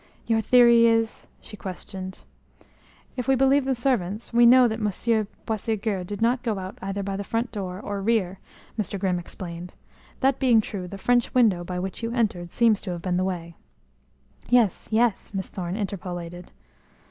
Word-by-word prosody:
"Your 225 -1 +2
theory 235 0 +6
is 225 -1 0
?" - - -35
she 210 - -10
questioned. 190 -1 -8 0.9
"If 250 -1 -4
we 270 - +4
believe 270 +1 +3
the 265 -1 +1
servants 230 -4 -1
we 240 0 +6
know 250 +1 +7
that 220 0 -3
Monsieur 215 +1 0 0.2
Boisségur 215 -3 -2
did 205 +3 -3
not 245 +2 +2
go 225 -5 -1
out 185 0 -7
either 195 +1 -3
by 195 0 -3
the 200 - -3
front 230 +4 -2
door 185 -3 -5
or 205 -1 -4
rear," 195 -4 0 0.4
Mr. 205 -1 -2
Grimm 185 -2 0
explained. 175 0 -8 0.5
"That 270 0 +2
being 245 -4 +5
true 200 -4 -4
the 200 - -8
French 245 +4 +1
window 210 -8 +4
by 180 +1 -5
which 190 +3 -4
you 230 0 -2
entered 190 -8 -1
seems 225 -3 +3
to 195 - -6
have 170 -1 -7
been 180 -1 0
the 185 - +1
way." 170 -3 -4 0.9
"Yes, 235 -6 +3
yes," 220 -2 +1
Miss 190 -1 -3
Thorne 180 -1 -4
interpolated. 180 -4 -5
210 Hz, 180 wpm, -25 LUFS, 185-235 Hz, 0.9 s, know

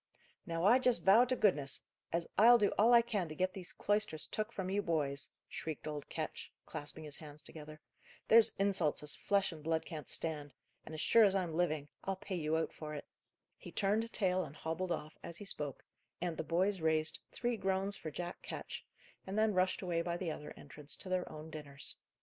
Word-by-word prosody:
"Now 165 +1 -1
I 235 +6 +7
just 250 -9 +3
vow 215 +6 +7
to 255 +1 0
goodness, 150 - +2 0.3
as 170 0 0
I'll 235 +3 +8
do 210 -3 +3
all 225 +3 +5
I 235 -1 +8
can 205 -8 -1
to 155 - -6
get 185 +3 0
these 180 -3 -5
cloisters 205 -7 +1
took 215 +1 -3
from 190 -4 -3
you 205 +1 +2
boys," 145 -6 0 0.2
shrieked 160 -2 -5
old 150 -1 -5
Ketch, - - -5
clasping 150 +2 -4
his 150 -2 -7
hands 150 -1 -9
together. 155 -1 -10 0.5
"There's 225 0 +7
insults 190 -7 +1
as 145 -1 0
flesh 200 -2 +1
and 155 -2 -10
blood 160 0 0
can't 155 -2 -7
stand; 150 -3 -1 0.3
and, 155 - -8
as 155 - -3
sure 230 - +6
as 200 -2 +4
I'm 180 -4 0
living, 155 -4 0 0.2
I'll 195 - -1
pay 190 +1 -7
you 160 -2 +1
out 160 - -1
for 150 -1 -6
it." 145 - -6 0.5
He - - -9
turned 215 +3 +1
tail 185 -2 +1
and 150 -2 -9
hobbled 165 +4 -3
off, 155 -2 -4
as 170 - -5
he 205 - -7
spoke, 145 -7 -4 0.3
and 175 -1 -2
the 160 - -3
boys 180 +4 +1
raised 160 0 +2
"three 240 -1 -1
groans 195 0 0
for 160 - -6
Jack 175 +3 -5
Ketch," - - -6 0.4
and 195 +2 -3
then 215 -1 +3
rushed 185 +1 +1
away 170 -2 0
by 170 0 -2
the 175 -3 -2
other 150 -1 -7
entrance 145 0 -5
to 185 - -8
their 185 -1 -1
own 155 +1 -8
dinners. 145 -2 -6
170 Hz, 210 wpm, -35 LUFS, 155-195 Hz, 0.5 s, I'll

